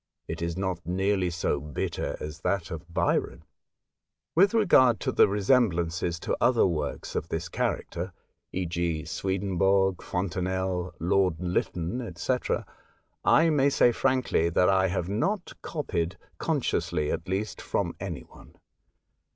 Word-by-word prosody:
It 80 Hz, 0 st, -5 dB
is 85 Hz, +1 st, -2 dB
not 95 Hz, -2 st, -2 dB
nearly 95 Hz, +2 st, +1 dB
so 80 Hz, -3 st, -1 dB
bitter 75 Hz, -1 st, -3 dB
as 75 Hz, +1 st, -6 dB
that 90 Hz, -1 st, -1 dB
of 85 Hz, +1 st, -7 dB
Byron. -, -, 0 dB, 0.9 s
With 195 Hz, +7 st, +4 dB
regard 130 Hz, -, +5 dB
to -, -, 0 dB
the -, -, +5 dB
resemblances 90 Hz, -6 st, +1 dB
to -, -, -1 dB
other 120 Hz, -1 st, +4 dB
works 75 Hz, -6 st, -2 dB
of -, -, -3 dB
this 80 Hz, +2 st, -2 dB
character, 90 Hz, +2 st, -2 dB, 0.4 s
e.cj.y 85 Hz, -3 st, -1 dB
Swedenborg, 95 Hz, +1 st, +1 dB
Fontenelle, 90 Hz, 0 st, -2 dB
Lord 90 Hz, -2 st, +2 dB
Lytton, 90 Hz, +4 st, -2 dB
&c., 105 Hz, +9 st, 0 dB, 0.9 s
I 165 Hz, 0 st, +5 dB
may 140 Hz, -2 st, +4 dB
say 125 Hz, -3 st, +4 dB
frankly 130 Hz, -9 st, +1 dB
that 90 Hz, +2 st, +3 dB
I 95 Hz, -1 st, +4 dB
have 90 Hz, -2 st, -2 dB
not 175 Hz, -, -1 dB
copied, 90 Hz, -, -2 dB, 0.2 s
consciously 75 Hz, -1 st, 0 dB
at 85 Hz, -, -4 dB
least, 100 Hz, +3 st, -2 dB
from -, -, -1 dB
any -, -, -4 dB
one. -, -, -17 dB
90 Hz, 130 wpm, -27 LUFS, 85-100 Hz, 0.9 s, regard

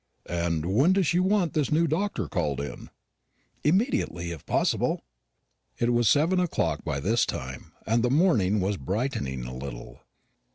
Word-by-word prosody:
"And 85 Hz, -2 st, -1 dB
when 130 Hz, -, +3 dB
does 190 Hz, -1 st, +2 dB
she 175 Hz, -, +2 dB
want 185 Hz, -3 st, +2 dB
this 150 Hz, -3 st, 0 dB
new 160 Hz, +3 st, +3 dB
doctor 180 Hz, +7 st, -1 dB
called 75 Hz, -8 st, -1 dB
in?" 70 Hz, -, -6 dB, 0.7 s
"Immediately, 150 Hz, -, +1 dB
if 80 Hz, -4 st, -9 dB
possible." -, -, +1 dB, 0.7 s
It 120 Hz, +1 st, +1 dB
was 120 Hz, -3 st, +3 dB
seven 165 Hz, +6 st, +3 dB
o'clock 85 Hz, -, 0 dB
by 75 Hz, -4 st, -2 dB
this 110 Hz, +11 st, +2 dB
time, 65 Hz, -5 st, -5 dB
and 115 Hz, +1 st, +2 dB
the 125 Hz, -, +2 dB
morning 120 Hz, -, +3 dB
was 100 Hz, +1 st, 0 dB
brightening 70 Hz, -, -2 dB
a 60 Hz, -, -6 dB
little. 65 Hz, -2 st, -8 dB
110 Hz, 155 wpm, -27 LUFS, -, 0.7 s, when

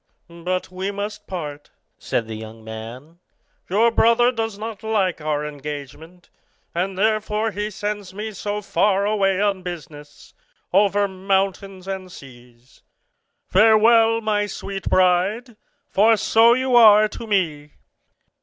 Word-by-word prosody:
"But 185 Hz, +1 st, -2 dB
we 185 Hz, +2 st, -4 dB
must 205 Hz, +1 st, -6 dB
part," 150 Hz, -5 st, -7 dB, 0.3 s
said 115 Hz, -, -2 dB
the 110 Hz, -, -7 dB
young 110 Hz, +1 st, -10 dB
man; 115 Hz, +9 st, -10 dB, 0.5 s
"your 220 Hz, +5 st, +3 dB
brother 235 Hz, +2 st, +4 dB
does 225 Hz, -4 st, -4 dB
not 220 Hz, -1 st, -7 dB
like 205 Hz, -7 st, -1 dB
our 150 Hz, -1 st, -2 dB
engagement, 150 Hz, +4 st, -9 dB, 0.4 s
and 185 Hz, +2 st, -2 dB
therefore 215 Hz, +1 st, 0 dB
he 205 Hz, +1 st, -3 dB
sends 205 Hz, -1 st, -5 dB
me 210 Hz, +3 st, -6 dB
so 205 Hz, +1 st, -4 dB
far 200 Hz, 0 st, +1 dB
away 195 Hz, -2 st, +1 dB
on 200 Hz, -2 st, 0 dB
business, 150 Hz, -5 st, -10 dB, 0.4 s
over 200 Hz, +1 st, +3 dB
mountains 195 Hz, 0 st, -2 dB
and 190 Hz, -1 st, -6 dB
seas. 125 Hz, -4 st, -16 dB, 0.6 s
Farewell, 225 Hz, +2 st, +4 dB
my 210 Hz, -1 st, 0 dB
sweet 195 Hz, -1 st, -6 dB
bride; 190 Hz, +7 st, +1 dB, 0.4 s
for 220 Hz, +3 st, +4 dB
so 230 Hz, +3 st, +4 dB
you 260 Hz, -1 st, 0 dB
are 215 Hz, -2 st, +7 dB
to 225 Hz, +2 st, -9 dB
me." 155 Hz, -8 st, -1 dB
195 Hz, 125 wpm, -21 LUFS, 170-215 Hz, 0.6 s, are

